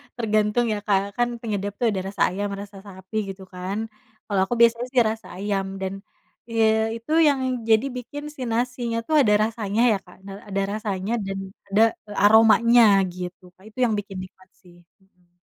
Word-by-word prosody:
tergantung 215 0 +1
ya, 205 - -3
Kak, 195 -2 +3 0.2
kan 240 - +3
penyedap 205 -3 -3
itu 240 - -1
ada 190 -2 -2
rasa 200 0 -6
ayam, 205 +2 -2
rasa 200 -1 -11
sapi 190 +2 -12
gitu 190 0 -8
kan, 185 +3 -4 0.5
kalo 200 -2 -1
aku 240 - -1
biasanya 235 +1 +4
sih 250 - +5
rasa 225 0 -6
ayam 195 0 -2 0.2
dan 190 0 -3 0.6
ye 225 -1 +2 0.3
itu 230 +6 -10 0.2
yang 280 -2 +2 0.3
jadi 220 +3 +4
bikin 285 +4 -7
si 265 - -10
nasinya 240 0 -1
tuh 310 - +1
ada 210 -4 +3
rasanya 220 -1 -1
ya, 210 - +2
Kak, - - -17
na 195 - -8 0.2
ada 195 -1 -1
rasanya 205 -1 -3
dan 195 0 -4 0.3
ada, 200 +3 +2 0.3
eee, 205 - -9
aromanya 225 +2 +6 0.3
gitu, 180 0 -7
Kak, 190 - -23
itu 220 - -27
yang 225 -3 +2
bikin 200 -1 -9
nikmat 185 0 -15
sih, 175 -2 -19 0.3
mhm. 180 -2 -34
210 Hz, 185 wpm, -23 LUFS, 195-230 Hz, 0.6 s, aromanya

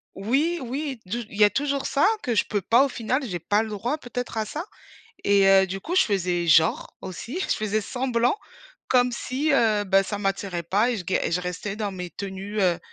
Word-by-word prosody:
Oui 280 - 0
oui 265 0 -4
du 230 +6 -3
il 205 - -10
y 210 - +6
a 205 - +7
toujours 280 +1 -1
ça 280 +6 +2 0.2
que 245 - 0
je 220 - +2
peux 205 -2 -1
pas 240 +8 +4
au - - -2
final, 250 +4 -1
j'ai 175 -3 -4
pas 205 +6 +1
le 220 - -4
droit 235 +8 -2
peut-être 245 -4 -6
à 215 - 0
ça 310 - -5 0.6
et 200 -1 +4
heu, 190 0 +6
du 195 +1 -5
coup 350 - -3
je 380 - +7
faisais 180 -4 0
genre 160 0 +3
aussi, 235 - -6
je - - 0
faisais 215 0 -1
semblant 245 - 0 0.5
comme 250 -1 +4
si, 270 +6 -2
heu, 215 -5 +3
bah 195 0 +4
ça 205 +1 -4
m'attirait 195 -3 -2
pas 205 +8 +1
et 235 - -1
je 180 - -6
g 190 - +1
je 180 +2 0
restais 180 +3 -4
dans 210 -2 -2
mes 180 -2 -6
tenues, 200 +1 -5
heu, 180 -3 +2
215 Hz, 225 wpm, -25 LUFS, 195-250 Hz, 0.6 s, a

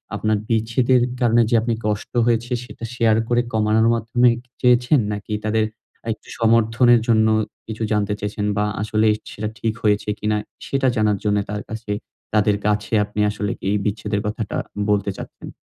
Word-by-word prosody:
আপনার 110 -1 +1
বিচ্ছেদের 115 +3 +2 0.2
কারণে 120 -1 +4
যে 120 - +3
আপনি 115 +1 0
কষ্ট 105 0 -3
হয়েছে 120 +1 0
সেটা 115 - -12
শেয়ার 115 -2 +3
করে 120 0 +3
কমানোর 110 +1 +3
মাধ্যমই 115 +1 +2
কি 125 - -35
চেয়েছেন? 125 +2 +4
নাকি 105 +1 -5
তাদের 110 0 +2 0.4
আ - - -26
একটু - - -20
সমর্থনের 115 +1 +4
জন্য 110 -2 +4 0.4
কিছু 110 0 -4
জানতে 105 -1 +1
চেয়েছেন? 105 0 -3
বা 105 - +2 0.2
আসলেই 110 0 +2 0.2
সেটা 105 0 -4
ঠিক 110 -1 0
হয়েছে 105 -1 +1
কিনা 105 0 0 0.3
সেটা 135 -1 +1
জানার 105 -2 +2
জন্য 105 -1 +2
তার 105 0 -4
কাছে 110 -1 -5 0.4
তাদের 105 -1 +3
কাছে 105 +1 -1
আপনি 105 +1 -7
আসলে 105 -1 -2 0.2
এই 105 - +2
বিচ্ছেদের 105 0 -1
কথাটা 105 0 -3 0.3
বলতে 100 -1 +1
চাচ্ছেন? - - -9
110 Hz, 165 wpm, -21 LUFS, 105-115 Hz, 0.4 s, কারণে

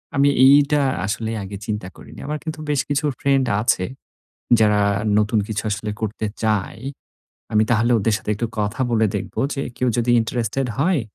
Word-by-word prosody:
আমি 140 0 +4 0.2
এইটা 145 +1 +5 0.2
আসলে 110 +2 -2
আগে 100 +1 -7
চিন্তা 105 -4 -3
করিনি। - - -13
আমার 150 +1 -2
কিন্তু 160 -1 -5
বেশ 145 -3 +2
কিছু 145 +1 0
friend 135 -1 +2 0.2
আছে, 95 -5 +1 0.8
যারা 105 -1 +4 0.4
নতুন 105 +1 +2
কিছু 110 0 -2
আসলে 105 +1 -3
করতে 110 0 -3 0.2
চায়। 105 -4 -1 0.7
আমি 110 0 +4
তাহলে 115 +1 +2
ওদের 110 +2 +1
সাথে - - -5
একটু 115 +3 -2
কথা 105 +6 -2
বলে 110 -2 +3
দেখব - - -6 0.2
যে 140 - -3
কেউ 125 - 0
যদি 120 0 +1
interested 120 +3 -2
হয়, 170 +1 +2
115 Hz, 165 wpm, -21 LUFS, 105-140 Hz, 0.8 s, এইটা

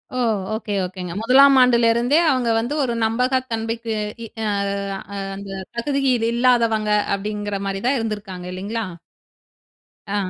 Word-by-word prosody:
ஓ! - - -2 0.4
Okay 215 -1 -4
ஓகேங்க. 180 -1 -5
1லாம் 270 +4 +6
ஆண்டுல 240 -2 +4
இருந்தே, 245 +6 +2
அவங்க 255 -4 +1
வந்து 235 +5 -1
ஒரு 245 -3 -1
நம்பகத்தன்மைக்கு 230 -1 -1 0.3
இ - - -8 0.2
அ, - - -1 0.7
அ - - -4 0.2
அந்த 200 0 -8 0.3
தகுதியில் 260 -2 +1
இல்லாதவங்க 230 -3 +2 0.2
அப்படிங்கிற 205 0 -4
மாரி 195 0 -3
தான் 270 +1 +2
இருந்திருக்காங்க, 205 -5 -5
இல்லைங்களா? 205 +5 -3 1.2
அ. 200 - -3
225 Hz, 130 wpm, -21 LUFS, 205-250 Hz, 1.2 s, 1லாம்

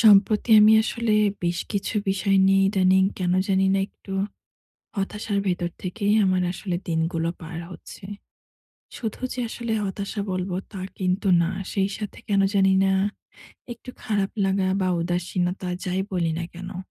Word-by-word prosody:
সম্প্রতি 210 +1 +5
আমি 215 +1 +7
আসলে 230 0 -1 0.3
বেশ 175 0 0
কিছু 200 +2 -2
বিষয় 195 0 +2
নিয়ে 195 0 +4
ইদানিং 190 -1 +4
কেনো 180 0 +1
জানি 190 0 +3
না - - +2
একটু 195 - -12 0.8
হতাশার 205 +1 -2
ভেতর 175 -2 -1
থেকেই 200 +3 -1
আমার 185 -1 +2
আসলে 180 -1 -3
দিনগুলো 165 0 0
পার 165 0 -7
হচ্ছে। 180 - -11 0.9
শুধু 225 -3 -5
যে 250 - -4
আসলে 235 0 -4
হতাশা 200 +2 -4
বলবো 185 0 -2 0.2
তা 195 - -7 0.2
কিন্তু 185 +2 0
না, 165 - 0 0.2
সেই 195 -1 +1
সাথে 210 -2 -6
কেনো 200 -1 +3
জানি 195 -1 +4
না, 195 - +3 0.8
একটু 240 +2 -10
খারাপ 205 -4 0
লাগা 190 0 +1
বা 185 - +1
উদাসীনতা 180 +1 -2 0.2
যাই 185 +1 -1
বলি 170 -3 0
না 170 - -3
কেনো, 180 +1 -8
190 Hz, 150 wpm, -24 LUFS, 180-200 Hz, 0.9 s, আমি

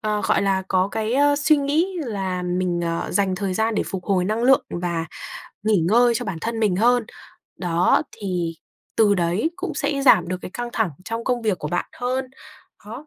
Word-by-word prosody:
ờ, 210 -1 -1
gọi - - +3
là 195 -1 +1
có 185 0 +2
cái 220 +2 -2
ơ, 285 +1 +4
suy 300 +1 +4
nghĩ 290 +6 +1 0.2
là 190 -4 -3
mình 180 -1 -1
ờ, 170 0 -2
dành 195 -2 +1
thời 195 -1 -2
gian 220 +2 +1
để - - +1
phục 185 -2 -5
hồi 185 -3 +1
năng 215 +4 -1
lượng 265 +2 +5
và 175 -2 -2 0.6
nghỉ 215 -5 +3
ngơi 240 +3 +4
cho - - -3
bản 180 -4 -4
thân 225 +2 -3
mình 205 -5 +2
hơn. 240 +3 +3 0.5
Đó, 175 -1 +2
thì 180 -4 -2 0.4
từ 210 -2 +5
đấy 180 - 0
cũng 365 -5 -4
sẽ 280 -1 -1
giảm 255 -9 +5
được 185 - -2
cái - - -7
căng 240 +4 -5
thẳng 220 -6 0
trong 230 +2 -4
công 245 -2 0
việc 210 -5 0
của - - -4
bạn 175 - -1
hơn. 255 +2 -1 0.6
Đó. 250 +8 -8
210 Hz, 205 wpm, -22 LUFS, 185-245 Hz, 0.6 s, lượng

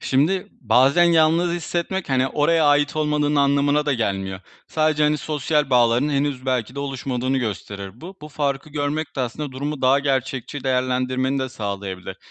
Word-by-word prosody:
Şimdi, 160 +8 +1
bazen 135 +7 +4
yalnız 170 +1 +3
hissetmek, 175 +1 -3
hani, 130 0 +2
oraya 155 +3 +2
ait 145 +1 +3
olmanın 150 -1 +1
anlamına 145 +1 +2
da 145 - +2
gelmiyor. 95 -5 -2 0.3
Sadece, 155 -1 +1
hani, 150 0 +3
sosyal 150 -1 -1
bağlarının 125 +3 +3
henüz 140 -2 -1
belki 125 -1 -1
de 140 - -4
oluşmadığını 135 -1 -2
gösterir 100 -2 -5
bu. 185 +3 -10
Bu 150 - -8
farkı 140 0 -2
görmek 145 +1 -3
de - - -1
aslında 130 +3 -4
durumu 140 +2 -4
daha 130 +2 +5
gerçekçi 135 -1 -2
değerlendirmeni 130 +1 0
de 130 0 -2
sağlayabilir. 100 -5 -5
140 Hz, 155 wpm, -22 LUFS, 130-150 Hz, 0.3 s, daha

